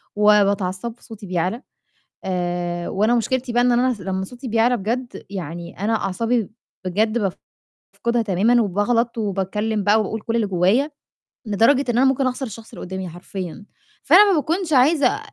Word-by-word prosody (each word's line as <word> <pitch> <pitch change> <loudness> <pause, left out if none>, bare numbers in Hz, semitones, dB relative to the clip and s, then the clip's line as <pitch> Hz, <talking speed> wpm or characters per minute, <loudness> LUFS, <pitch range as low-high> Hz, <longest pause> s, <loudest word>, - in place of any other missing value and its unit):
وباتعصّب 205 0 +2
صوتي 220 -3 -11
بيعلى، 180 - -1 0.6
آآ 175 -1 -2
وأنا 215 +5 +2
مشكلتي 245 +1 -1
بقى 240 +1 +3
إن 245 0 +3
أنا 250 +1 +2
ص 205 - -14
لمّا 190 +1 -3
صوتي 250 +4 -9
بيعلى 230 +2 +2
بجد 235 +4 -4
يعني 170 -1 -7
أنا 215 +3 0
أعصابي 225 +2 -1 0.3
بجد 215 +5 +1 0.8
بافقدها 235 0 0
تمامُا 220 +4 +3
وباغلط 230 +4 0
وباتكلِّم 210 +1 -1
بقى 210 +2 +4
وباقول 215 +1 -3
كل 230 0 -2
اللي 220 -3 +1
جوّايا، 195 - +2 0.6
لدرجة 230 +7 +3
إن 235 - -1
أنا 265 - +4
ممكن 265 0 +2
أخسر 255 +1 -3
الشخص 225 0 -10
اللي - - -8
قُدّامي 190 -1 -5
حرفيًا، 180 +2 -7 0.4
فأنا 410 -1 +7
ما - - +2
باكونش 330 +3 -1
عايزة 280 +6 +4
220 Hz, 155 wpm, -21 LUFS, 190-245 Hz, 0.8 s, فأنا